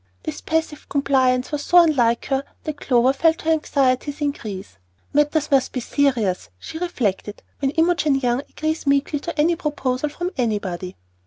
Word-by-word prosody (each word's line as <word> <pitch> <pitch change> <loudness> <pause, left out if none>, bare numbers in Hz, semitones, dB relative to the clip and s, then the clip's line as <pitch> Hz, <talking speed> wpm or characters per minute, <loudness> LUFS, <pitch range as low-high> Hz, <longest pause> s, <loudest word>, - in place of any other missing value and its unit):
This - - -5
passive 320 -2 -2
compliance 260 -2 +2
was 295 -1 -2
so 355 - +3
unlike 240 -8 +2
her 270 0 0 0.2
that 310 -2 -4
Clover 250 0 +3
felt 320 +3 +2
her 325 - +2
anxieties 280 -2 +1
increase. 205 - -4 0.3
"Matters 295 +1 +2
must 270 -2 +2
be 255 - -1
serious," 240 -8 0
she 320 - -8
reflected, 215 - -2 0.2
"when 275 - +1
Imogen 320 -1 +2
Young 250 -2 +1
agrees 315 -1 -3
meekly 280 +1 +2
to 325 +1 -6
any 335 +3 +3
proposal 295 -3 -2
from 350 +4 -4
anybody." 195 -7 -2
280 Hz, 155 wpm, -22 LUFS, 250-310 Hz, 0.3 s, so